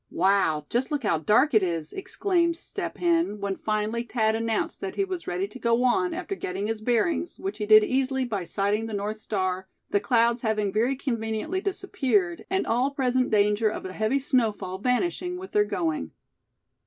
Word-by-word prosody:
"Wow! 170 -5 +2
just 245 +3 0
look 295 -3 -2
how 170 -7 +1
dark 225 - +3
it 215 - +6
is!" 165 -4 -2
exclaimed 350 -3 0
Step - - -6
Hen, 335 - +1
when 200 -1 -2
finally 215 +2 -1
Thad 220 -2 0
announced 225 -1 -2
that 195 - -4
he 395 - +1
was 370 -3 -5
ready 180 +2 -1
to 255 - -10
go 235 +1 +2
on, 350 +9 +2
after 365 +3 -4
getting 195 - -4
his 220 0 -3
bearings, 245 +10 0
which 390 - -5
he 210 - -2
did 215 0 +8
easily 265 +2 0
by 205 -6 -3
sighting 205 +4 0
the 220 - -4
North 205 +2 -3
star, 190 -3 -2 0.2
the 205 - +3
clouds 230 +3 +2
having 215 -3 0
very 235 +5 +2
conveniently 235 - -2
disappeared, 260 - -1
and 380 +1 0
all 245 +4 +1
present 255 -3 +1
danger 210 +1 +3
of 210 - -6
a 185 - -5
heavy 220 +7 +1
snowfall 225 -9 0
vanishing 345 - 0
with 375 +1 -9
their 210 0 +3
going. 160 - -2
225 Hz, 185 wpm, -26 LUFS, 205-270 Hz, 0.2 s, did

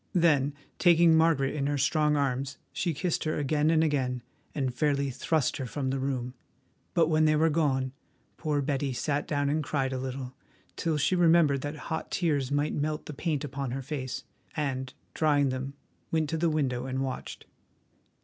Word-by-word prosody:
Then, 145 -5 +3 0.2
taking 170 -2 +6
Margaret 160 -4 +3
in 140 -2 -1
her 145 0 0
strong 150 +2 +2
arms, 135 -1 -1 0.2
she 175 - 0
kissed 165 +3 -1
her 155 - 0
again 150 +1 +1
and 160 -1 +4
again, 130 -5 0 0.3
and 130 -4 -1
fairly 140 +1 +1
thrust 155 +2 0
her 130 - -4
from 130 +1 -2
the 135 - -1
room. 130 -2 -2 0.6
But 165 -2 +4
when 155 -1 +3
they 155 0 +4
were 160 +1 +3
gone, 135 -4 +1 0.4
poor 150 -3 -1
Betty 140 -1 -1
sat 145 +3 -1
down 145 -1 0
and 150 +2 +1
cried 135 -3 -1
a 130 - -2
little, 130 0 -5 0.4
till 160 -2 0
she 155 +5 +2
remembered 165 -5 +4
that 145 +2 -4 0.2
hot 160 - -2
tears 145 -7 0
might 145 +1 +1
melt 150 +1 -2
the 150 - -6
paint 150 0 -1
upon 140 -1 -4
her 135 +2 -4
face, 130 -2 -4 0.3
and, 130 -3 -2 0.2
drying 145 -3 +3
them, 130 +2 -4 0.4
went 160 -2 +1
to 165 - 0
the 165 +1 +2
window 130 -5 -1
and 130 +1 -1
watched. 130 -1 -5
145 Hz, 180 wpm, -29 LUFS, 135-155 Hz, 0.6 s, taking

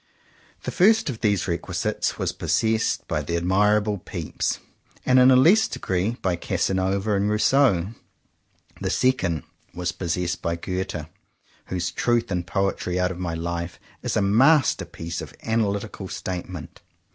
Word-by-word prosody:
The - - -3
first 220 -2 +4
of 115 - -9
these 100 -4 +1
requisites 85 -1 -2
was - - -1
possessed 110 0 0
by - - -1
the 85 - -2
admirable 105 +3 +2
Pepys, - - -3 0.5
and 130 0 +5
in 125 +1 +7
a 130 - +7
less 175 +13 +6
degree 95 +6 -2
by 90 -2 +1
Casanova 95 +4 0
and 100 +1 +1
Rousseau. 105 -3 +3 0.9
The - - -1
second 95 - +1 0.3
was 90 0 -1
possessed 90 0 -2
by 85 - -1
Goethe, 90 -2 -4 0.6
whose 90 -1 -2
"Truth 120 +3 0
and 90 -1 -2
Poetry 95 -2 -1
out 90 0 +1
of 90 - -7
my 85 -2 -2
Life" 85 +1 -4 0.2
is - - -1
a 105 - +2
masterpiece 110 - +2
of - - -9
analytical 105 -3 -1
statement. 90 -3 -6
95 Hz, 140 wpm, -24 LUFS, 90-110 Hz, 0.9 s, in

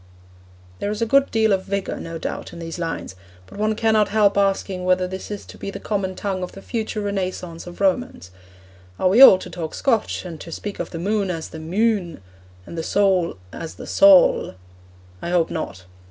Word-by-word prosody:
There 205 - -2
is 215 +2 -1
a - - +2
good 275 +4 +3
deal 220 -2 +2
of 190 -1 -1
vigour, 200 0 -3
no 165 0 -6
doubt, - - -5
in - - -9
these 165 0 -6
lines; 165 - -4 0.3
but 95 - -12
one 215 +1 +1
cannot 220 -1 +3
help 205 -1 +3
asking 195 -2 0
whether 185 0 +2
this 190 +1 -7
is 205 -1 -6
to - - -13
be - - -5
the - - -6
common 195 -3 -2
tongue 195 -2 -3
of 180 - -5
the 195 - -10
future 220 -2 -3
Renaissance 185 -4 -4
of 175 - -10
Romance. 195 - 0 0.7
Are 185 - +2
we 215 +8 +5
all 230 -8 +11
to - - -9
talk 165 -3 -5
Scotch, 230 -7 0
and 165 -4 -8
to 165 - -9
speak 205 +5 -6
of - - -3
the 165 - -6
moon 200 +3 0
as 165 -3 -4
the 160 - -9
'mune,' 180 - 0 0.4
and - - -9
the 165 - -2
soul 185 - +1 0.2
as 165 - -7
the - - -9
'saul'? 195 - +5 0.7
I - - -4
hope 175 -2 +1
not. 95 - -5
190 Hz, 205 wpm, -22 LUFS, 170-210 Hz, 0.7 s, all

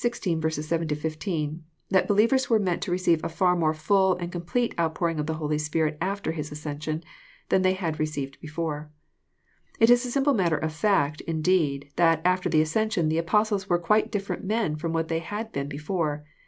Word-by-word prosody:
7—16, 160 -4 -2 0.3
that 190 - +3
believers 230 +6 +3
were 225 - +5
meant 185 -5 0
to 185 - -3
recei^Sirfar 175 0 +2
more 160 -3 +2
full 190 +4 +3
and 175 0 -5
complete 180 +8 -1
outpouring 165 0 0
of 150 - -2
the 160 - -1
Holy 150 -1 -1
Spirit 155 0 0
after 195 0 -1
His 150 -2 -5
ascension 150 +1 -4 0.5
thantirey 185 0 +3
had 165 -5 -3
received 145 -3 -3
before. 155 -1 -4 0.9
It 225 +1 +6
is 245 0 +5
a 250 - -3
simple 275 +3 +2
matter 175 - +2
of 160 0 -2
fnr.t, 155 -3 +1
Indeed, 155 -4 +1
that 165 -2 +4
after 185 0 +2
the 155 - +4
ascension 195 0 0
the 160 +1 +1
Apostles 205 +3 +1
were 175 - +4
quite 210 +6 +2
different 200 -2 -3
men 205 -5 0
from 160 +2 -3
what 165 0 -1
they 165 0 -1
had 210 +6 -5
been 140 0 -3
before. 150 0 -2
165 Hz, 170 wpm, -26 LUFS, 155-195 Hz, 0.9 s, It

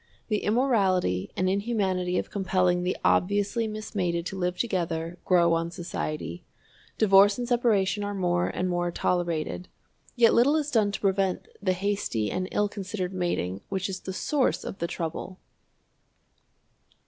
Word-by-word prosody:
The 210 -1 +1
immorality 200 - +1
and 185 - +1
inhumanity 190 -3 0
of - - -3
compelling 185 -3 +1
the 180 +1 -1
obviously 205 +4 +2
mismated 190 -5 -2
to 195 - -4
live 180 -1 -1
together, 170 -5 -2
grow 170 -2 +4
on 165 0 0
society. 155 - -5 0.5
Divorce 200 -1 +6
and 245 -1 -3
separation 215 -5 +2
are 205 0 -3
more 175 -2 +1
and 185 - -2
more 175 -1 0
tolerated. 175 0 -1 0.5
Yet 235 -2 +5
little 270 +6 +4
is 300 -1 -1
done 215 -3 +3
to - - -3
prevent 195 -2 0
the 185 -2 +2
hasty 185 - -1
and 185 0 -2
ill 210 - +1
considered 195 -2 -4
mating 100 - -2
which 190 -1 -1
is 190 0 -4
at - - -30
the 190 - -4
source 275 +7 0
of - - -7
the 170 - -1
trouble. 170 +2 -5
185 Hz, 150 wpm, -27 LUFS, 175-205 Hz, 0.5 s, Divorce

